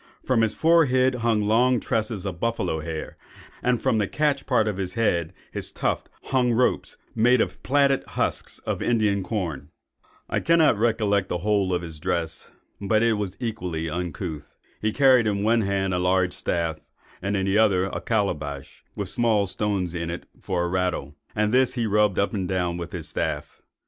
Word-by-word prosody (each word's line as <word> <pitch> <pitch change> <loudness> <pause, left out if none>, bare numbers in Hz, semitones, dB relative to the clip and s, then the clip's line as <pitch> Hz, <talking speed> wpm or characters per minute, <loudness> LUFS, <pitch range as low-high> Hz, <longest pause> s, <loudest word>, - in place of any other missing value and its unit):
From 125 -3 +2
his 110 -1 +1
forehead 130 -6 +4
hung 110 -2 +2
long 120 +4 +3
tresses 110 -3 -2
of 90 -3 -4
buffalo's 90 -9 -1
hair; 80 -1 -5 0.4
and 125 -1 +1
from 110 - +1
the 100 - +1
catch 145 +1 0
part 115 -5 +2
of 105 -3 -2
his 95 -2 -3
head 85 -8 +1 0.2
(his - - -5
tuft) - - -2
hung 125 -2 +1
ropes, 125 +2 +1 0.2
made 120 +2 +4
of - - +1
the - - -24
plaited 140 0 +2
husks - - -2
of - - -2
Indian 105 -4 +2
corn. 90 - -4 0.6
"I - - 0
cannot 165 -6 +4
recollect 105 -4 +1
the 90 - -1
whole 100 0 +1
of 90 -1 0
his 80 -2 -8
dress, 85 -1 -2 0.3
but 110 +2 +2
that 115 - +4
it - - +3
was 100 -3 -3
equally 90 -9 -3
uncouth. 85 -2 -5 0.2
He 110 - +1
carried 130 -3 +5
in 100 -1 0
one 115 +2 +3
hand 95 -2 0
a 90 - +1
large 90 0 +2
staff, 85 -2 -2 0.4
in 100 +2 -1
the 95 +1 +1
other 95 -4 +3
a 95 - -4
calabash, 75 - -2
with - - -3
small 110 -4 +2
stones 95 -2 -1
in 85 -1 -3
it 85 - -5 0.2
for 90 -2 -1
a - - 0
rattle; 90 -5 -1 0.2
and 105 +1 +1
this 130 0 +3
he 120 -2 0
rubbed 105 -2 +2
up 100 - +1
and 95 -4 -2
down 90 -2 -1
with 85 -1 -6
his 80 -4 -5
staff. - - -3
100 Hz, 185 wpm, -25 LUFS, 90-115 Hz, 0.6 s, carried